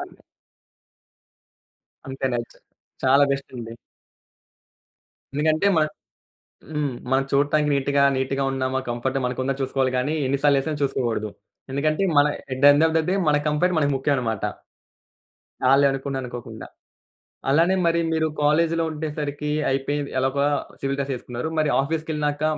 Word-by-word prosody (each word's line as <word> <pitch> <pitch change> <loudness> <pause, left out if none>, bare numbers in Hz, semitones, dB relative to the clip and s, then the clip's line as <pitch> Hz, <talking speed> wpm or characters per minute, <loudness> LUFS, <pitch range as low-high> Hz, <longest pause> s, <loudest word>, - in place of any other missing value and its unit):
అన్ని - - -10 1.9
అంతే. 135 0 -3
నెజ్ 120 -1 -4 0.5
చాలా 135 +2 +6
బెస్టండి. 125 -4 -5 1.6
ఎందుకంటే 155 +5 +2
మనం 155 -1 +3 0.8
హ్మ్. 150 -3 -1 0.2
మనం 135 +1 +3
చూడటానికి 145 +2 +2
నీట్‌గా, 140 0 +1
నీట్‌గా 130 +1 -1
ఉన్నామా, 130 0 -1
కంఫర్ట్‌గా 130 +3 -2
మనకుందని 130 +2 -2
చూసుకోవాలి 130 -1 0
గాని, 145 +5 0
ఎన్నిసార్లు 140 +2 +2
ఏసానని 150 +1 -3
చూసుకోకూడదు. 120 -6 -1 0.4
ఎందుకంటే, 155 +6 0
మన 145 - +7 0.3
at 130 - -3
the - - +9
end 145 +2 +4
of 160 - -2
the 160 - +3
day 185 - +1
మన 145 0 +4
కంఫర్ట్ 165 +5 +1
మనకి 145 -2 +2
ముఖ్యమన్నమాట. 125 -6 -1 1.3
ఆళ్ళే 140 +1 +5
అనుకున్న 135 0 -4
అనుకోకుండా. 120 -2 -8 0.8
అలానే 165 +7 +4
మరి 170 0 +2
మీరు 160 0 +1 0.2
కాలేజీలో 165 +2 +2
ఉండేసరికి 150 -1 -4 0.2
అయిపోయింది, 140 +1 -1
ఎలాగొల 135 +2 +1 0.4
సివిల్ 140 0 -1
డ్రెస్ 140 0 -2
ఏసుకున్నారు, 125 +4 -5
మరి 155 - +2
ఆఫీస్‌కెళ్ళినాక, 150 -1 -2
140 Hz, 125 wpm, -23 LUFS, 130-150 Hz, 1.9 s, the